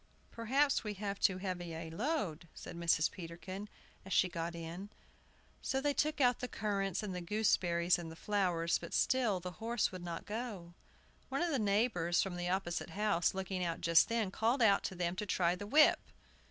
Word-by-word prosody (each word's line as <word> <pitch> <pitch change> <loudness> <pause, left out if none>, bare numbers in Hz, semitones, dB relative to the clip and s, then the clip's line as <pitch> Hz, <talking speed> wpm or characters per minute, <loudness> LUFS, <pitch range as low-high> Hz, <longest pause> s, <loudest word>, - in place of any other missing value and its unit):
"Perhaps 265 +5 +1
we 210 -1 -4
have 200 0 -4
too 190 - +3
heavy 180 -3 -4
a 160 0 -6
load," 200 - -2
said - - -8
Mrs. 170 -2 +2
Peterkin, 185 +4 -7 0.3
as 190 - -11
she 185 - +4
got 170 0 -4
in. 170 +4 -7 0.7
So 265 - -1
they 290 +1 +1
took 305 +1 0
out 250 -3 +4
the 250 - -3
currants 200 -4 -2
and 200 -3 -4
the 180 - -4
gooseberries 175 -3 +2
and 165 -2 -7
the - - -9
flowers, 175 -3 0
but - - -6
still 240 -8 +2
the 180 +1 -6
horse 230 0 0
would 185 -2 -7
not 170 -1 -5
go. 210 -6 -5 0.6
One 275 +5 0
of 345 - 0
the 275 - +1
neighbors, 200 -5 +1
from 190 -2 -4
the 175 0 -2
opposite 180 -2 -2
house, 195 -1 +1
looking 190 -1 -2
out 170 -1 -2
just 165 -1 +5
then, 225 -4 0
called 230 +5 +1
out 200 -3 +5
to 190 - -3
them 175 0 -1
to 210 - -2
try 175 -2 +2
the 205 +3 -6
whip. 300 +7 +6
190 Hz, 195 wpm, -34 LUFS, 175-220 Hz, 0.7 s, whip